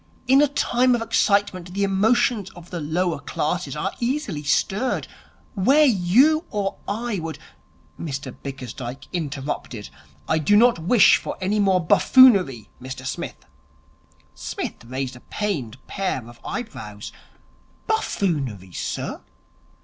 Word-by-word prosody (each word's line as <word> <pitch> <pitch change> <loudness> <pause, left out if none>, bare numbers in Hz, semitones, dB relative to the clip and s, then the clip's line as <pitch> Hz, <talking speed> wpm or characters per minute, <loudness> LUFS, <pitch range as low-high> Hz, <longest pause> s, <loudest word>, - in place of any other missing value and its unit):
In 265 +2 +6
a 295 - +5
time 255 -2 +2
of 235 - -2
excitement 200 -5 +1
the 200 - +1
emotions 205 +1 +2
of 175 -1 -13
the 175 - -3
lower 165 +2 -1
classes 150 +1 -2
are 190 +6 -2
easily 240 - -2
stirred. 205 - 0 0.5
Where 270 +10 +4
you 255 - +4
or 200 -2 -2
I 220 0 -2
would 165 -1 -5 0.4
' - - -33
Mr 140 -4 -5
Bickersdyke 130 -1 -7
interrupted. 140 -8 -4 0.4
'I 160 - +2
do 155 +7 +3
not 240 -3 +5
wish 200 +7 +6
for - - -6
any 195 +3 0
more 190 -4 +2
buffoonery, 190 - +5
Mr 130 +1 -7
Smith 130 - -5 0.5
' - - -35
Psmith - - -6
raised 130 +1 -4
a - - -12
pained 140 - -3
pair 185 - -3
of 120 0 -14
eyebrows. 110 - -6 0.7
'Buffoonery, 145 - -1
sir!' - - -4
185 Hz, 130 wpm, -23 LUFS, 140-225 Hz, 0.7 s, In